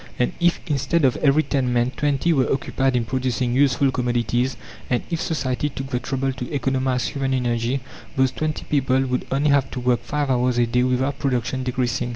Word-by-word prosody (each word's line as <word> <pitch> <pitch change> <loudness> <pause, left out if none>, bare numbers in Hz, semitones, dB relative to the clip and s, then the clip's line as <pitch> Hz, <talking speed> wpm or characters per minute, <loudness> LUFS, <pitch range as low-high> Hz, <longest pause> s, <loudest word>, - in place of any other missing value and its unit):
And 125 - +1
if, 175 -1 +2
instead 145 0 +1
of 130 - +3
every 150 +2 +3
10 130 -5 0
men, 120 +1 +1
20 145 +4 +1
were 135 -4 +1
occupied 135 -1 0
in 120 -2 +1
producing 130 0 -1
useful 135 0 +3
commodities, 120 0 0 0.3
and 125 - +1
if 165 - -1
society 150 -2 -1
took 135 0 -7
the 125 - 0
trouble 135 +1 -2
to 125 -1 -6
economize 130 -3 0
human 135 -1 -1
energy, 120 +1 0 0.3
those 130 -1 +3
20 155 -1 -3
people 135 -2 +2
would 125 -1 -2
only 140 +2 +2
have 140 -2 +3
to 130 - -5
work 125 -1 +1
5 145 -2 -1
hours 125 -1 +1
a 120 - +4
day 125 +1 +1
without 130 +2 0
production 130 -1 -1
decreasing. 125 -1 -1
130 Hz, 190 wpm, -22 LUFS, 125-140 Hz, 0.3 s, a